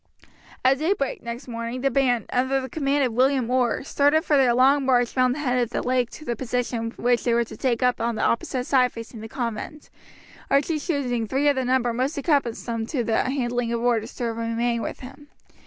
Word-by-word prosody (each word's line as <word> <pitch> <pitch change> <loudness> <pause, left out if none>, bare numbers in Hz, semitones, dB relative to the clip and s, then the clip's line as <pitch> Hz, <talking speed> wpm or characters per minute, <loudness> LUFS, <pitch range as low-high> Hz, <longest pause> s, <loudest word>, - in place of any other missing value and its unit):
At 265 +1 +4
daybreak 315 -3 -1
next 235 +3 -7
morning 230 +1 -5
the 275 0 +1
band, 245 -3 +1
under 260 +2 +1
the 260 0 -6
command 285 -2 +1
of 245 - -2
William 255 0 +2
Orr, 250 -1 +1
started 290 +3 +2
for 300 - +3
their 255 -4 +4
long 270 +3 +4
march 245 -2 +2
round 255 -1 +3
the - - -6
head 250 -3 +1
of 240 - -1
the - - -3
lake 250 -1 +1
to 305 - -11
the 240 - -2
position 240 -2 -2
which 245 0 +1
they 235 -1 +2
were 235 - +3
to 230 - -10
take 250 -2 0
up 250 -2 +2
on 235 0 0
the - - -2
opposite 250 +2 0
side 255 -2 +3
facing 230 -1 -9
the 220 - -8
convent, 240 +5 -5 0.6
Archie 295 +3 +2
choosing 255 -8 -1
three 270 +5 +1
of 285 - +2
the 260 -1 -1
number 250 -1 +1
most 260 +6 -1
accustomed 235 -6 -1
to 265 -6 -1
the 225 -1 +1
handling 245 -3 -1
of 235 - -1
oars 235 -1 0
to 245 - -3
remain 230 +1 -1
with - - -5
him. 275 +3 -11
250 Hz, 215 wpm, -24 LUFS, 235-270 Hz, 0.6 s, At